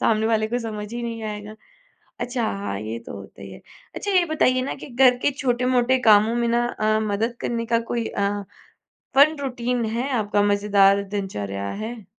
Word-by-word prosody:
सामने 220 Hz, 0 st, +2 dB
वाले 220 Hz, -1 st, +1 dB
को 245 Hz, +2 st, -1 dB
समझ 215 Hz, -2 st, -6 dB
ही 240 Hz, 0 st, -4 dB
नहीं 230 Hz, -1 st, -5 dB
आएगा 210 Hz, 0 st, -6 dB, 0.7 s
अच्छा 245 Hz, -1 st, -2 dB
हाँ, 100 Hz, 0 st, -3 dB
ये 110 Hz, +2 st, -5 dB
तो -, -, -7 dB
होता 100 Hz, 0 st, -12 dB
ही 100 Hz, -, -9 dB
है। 95 Hz, -, -12 dB, 0.3 s
अच्छा 405 Hz, -, -3 dB
ये 365 Hz, -2 st, +4 dB
बताइए 255 Hz, -5 st, +2 dB
ना 270 Hz, -, -3 dB
कि -, -, -10 dB
घर 250 Hz, 0 st, +4 dB
के -, -, +3 dB
छोटे-मोटे 255 Hz, -1 st, +1 dB
कामों 215 Hz, 0 st, +5 dB
में 235 Hz, 0 st, 0 dB
ना 240 Hz, +1 st, +2 dB
अ, 215 Hz, -2 st, 0 dB
मदद 225 Hz, +4 st, -1 dB
करने 230 Hz, -1 st, -2 dB
का 230 Hz, 0 st, +2 dB
कोई 235 Hz, -2 st, -1 dB
अ, 200 Hz, 0 st, -1 dB, 0.7 s
फन 295 Hz, +3 st, +6 dB
रूटीन 245 Hz, -2 st, -2 dB
है 235 Hz, +5 st, -2 dB
आपका? 210 Hz, -4 st, +1 dB
मज़ेदार 200 Hz, -1 st, +3 dB
दिनचर्या 105 Hz, -, -4 dB, 0.2 s
है? 225 Hz, -2 st, -7 dB
225 Hz, 185 wpm, -23 LUFS, 205-245 Hz, 0.7 s, फन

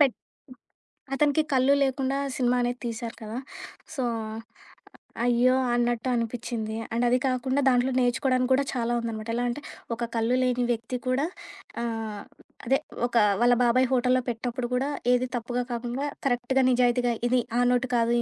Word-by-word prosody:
పె 290 Hz, -, +8 dB, 1.1 s
అతనికి 295 Hz, +2 st, +3 dB
కళ్ళు 260 Hz, +1 st, +4 dB
లేకుండా 270 Hz, 0 st, -1 dB, 0.2 s
సినిమానేది 245 Hz, -1 st, +1 dB
తీశారు 230 Hz, 0 st, -5 dB
కదా! 220 Hz, +2 st, -5 dB, 0.6 s
సో, 265 Hz, -, -2 dB, 1.2 s
అయ్యో! 245 Hz, +1 st, +4 dB, 0.2 s
అన్నట్టు 240 Hz, 0 st, 0 dB
అనిపిచ్చింది. 230 Hz, -1 st, -3 dB, 0.2 s
అండ్ 240 Hz, +1 st, +1 dB
అది 250 Hz, +1 st, +3 dB
కాకుండా 260 Hz, +2 st, 0 dB
దాంట్లో 250 Hz, +1 st, +3 dB
నేర్చుకోవడానికి 255 Hz, +1 st, +1 dB
కూడా 275 Hz, +2 st, +3 dB
చాలా 240 Hz, -1 st, -1 dB
ఉందనమాట. 225 Hz, -1 st, -5 dB
ఎలాంటే, 245 Hz, +3 st, -1 dB, 0.3 s
ఒక 235 Hz, 0 st, -3 dB
కళ్ళు 230 Hz, +3 st, +2 dB
లేని 250 Hz, -1 st, +1 dB
వ్యక్తి 230 Hz, +2 st, -4 dB
కూడా 260 Hz, +4 st, +1 dB, 0.6 s
ఆహ్, 225 Hz, -3 st, -4 dB, 0.4 s
అదే, 270 Hz, +3 st, +3 dB, 0.3 s
ఒక 240 Hz, -, -5 dB, 0.2 s
వాళ్ళ 245 Hz, 0 st, +5 dB
బాబాయ్ 255 Hz, +2 st, +4 dB
హోటల్లో 255 Hz, 0 st, +3 dB
పెట్టినప్పుడు 240 Hz, +1 st, -3 dB
కూడా 265 Hz, +3 st, 0 dB, 0.2 s
ఏది 250 Hz, 0 st, +2 dB
తప్పుగా 245 Hz, +1 st, -2 dB
కాకుండా, 240 Hz, +3 st, -3 dB, 0.2 s
కరెక్ట్‌గా, 255 Hz, +1 st, +1 dB
నిజాయితీగా 245 Hz, -1 st, +2 dB, 0.2 s
ఇది 250 Hz, 0 st, +3 dB, 0.2 s
ఆ -, -, +4 dB
నోటు 250 Hz, +1 st, +1 dB
కాదు, 230 Hz, 0 st, +2 dB
245 Hz, 140 wpm, -26 LUFS, 235-255 Hz, 1.2 s, పె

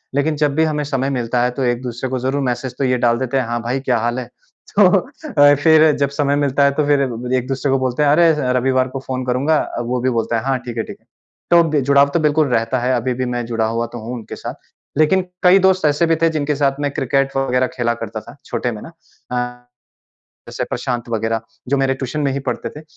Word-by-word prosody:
लेकिन 150 Hz, +2 st, +1 dB
जब 145 Hz, -2 st, +1 dB
भी 160 Hz, -, +3 dB
हमें 150 Hz, -2 st, 0 dB
समय 135 Hz, -2 st, -1 dB
मिलता 125 Hz, -2 st, -1 dB
है 125 Hz, -, +1 dB
तो 130 Hz, +2 st, -3 dB
एक 120 Hz, -1 st, 0 dB
दूसरे 125 Hz, +1 st, -4 dB
को 130 Hz, 0 st, -2 dB
ज़रूर 135 Hz, +3 st, -1 dB
मैसेज 125 Hz, +1 st, -5 dB
तो -, -, -1 dB
ये 125 Hz, -1 st, +2 dB
डाल 120 Hz, -1 st, +2 dB
देते 130 Hz, 0 st, -1 dB
हैं, 130 Hz, -, 0 dB
"हाँ 120 Hz, 0 st, -2 dB
भाई, 120 Hz, +3 st, -2 dB
क्या 130 Hz, -2 st, 0 dB
हाल 120 Hz, +2 st, -1 dB
है?" 125 Hz, -, -7 dB, 0.5 s
तो -, -, +8 dB, 0.4 s
अ, 145 Hz, -, +6 dB
फिर 155 Hz, +1 st, +5 dB
जब 140 Hz, -1 st, +1 dB
समय 140 Hz, 0 st, 0 dB
मिलता 140 Hz, -1 st, +1 dB
है 140 Hz, -, +4 dB
तो 150 Hz, -, +3 dB
फिर 145 Hz, -1 st, +3 dB, 0.4 s
एक 125 Hz, 0 st, -3 dB
दूसरे 135 Hz, +1 st, -1 dB
को 135 Hz, -, +2 dB
बोलते 130 Hz, +2 st, 0 dB
हैं, 145 Hz, -, +4 dB
"अरे, 165 Hz, +2 st, +5 dB
स -, -, -4 dB, 0.2 s
रविवार 130 Hz, 0 st, +2 dB
को 135 Hz, +1 st, -5 dB
फ़ोन 130 Hz, -1 st, -3 dB
करूँगा।" 135 Hz, +5 st, +1 dB, 0.2 s
अ, -, -, -1 dB
वो 125 Hz, +1 st, -2 dB
भी 130 Hz, -, +1 dB
बोलता 115 Hz, -1 st, 0 dB
है, 110 Hz, -, -3 dB
"हाँ, 135 Hz, -1 st, +1 dB
ठीक 120 Hz, -1 st, -6 dB
है, 115 Hz, -, 0 dB
ठीक -, -, -10 dB
है।" -, -, -37 dB, 0.5 s
तो 170 Hz, -1 st, +7 dB
बे 150 Hz, -2 st, +1 dB
जुड़ाव 140 Hz, 0 st, +5 dB
तो -, -, +2 dB
बिल्कुल 150 Hz, -1 st, +2 dB
रहता 120 Hz, +1 st, 0 dB
है। 125 Hz, +2 st, 0 dB
अभी 125 Hz, +1 st, -1 dB
भी 130 Hz, +1 st, -2 dB
मैं 120 Hz, -1 st, -2 dB
जुड़ा 115 Hz, -1 st, -1 dB
हुआ 115 Hz, +1 st, -1 dB
तो 120 Hz, -, -5 dB
हूँ 120 Hz, -, -5 dB
उनके 115 Hz, -3 st, -8 dB
साथ। -, -, -6 dB, 0.4 s
लेकिन 155 Hz, +5 st, +4 dB, 0.2 s
कई 185 Hz, +2 st, +7 dB
दोस्त 190 Hz, -2 st, +3 dB
ऐसे 150 Hz, +3 st, +3 dB
भी 165 Hz, -, +3 dB
थे 165 Hz, -, +4 dB
जिनके 150 Hz, -2 st, -1 dB
साथ 140 Hz, -1 st, 0 dB
मैं 145 Hz, -1 st, -1 dB
क्रिकेट 135 Hz, +1 st, 0 dB
वग़ैरह 130 Hz, -1 st, +1 dB
खेला 120 Hz, -2 st, 0 dB
करता 110 Hz, -1 st, -5 dB
था, 120 Hz, +3 st, -13 dB
छोटे 125 Hz, -, -2 dB
में 105 Hz, -2 st, -7 dB
ना। -, -, -9 dB, 0.4 s
अ, 125 Hz, 0 st, -4 dB, 0.8 s
जैसे -, -, -4 dB
प्रशांत 120 Hz, -2 st, -3 dB
वग़ैरह 115 Hz, 0 st, -1 dB, 0.3 s
जो 140 Hz, -, +2 dB
मेरे 135 Hz, 0 st, +1 dB
ट्यूशन 130 Hz, +3 st, -4 dB
में 140 Hz, -2 st, +1 dB
ही 140 Hz, -, -2 dB
पढ़ते -, -, -2 dB
थे 150 Hz, -, -11 dB
130 Hz, 255 wpm, -19 LUFS, 120-145 Hz, 0.8 s, तो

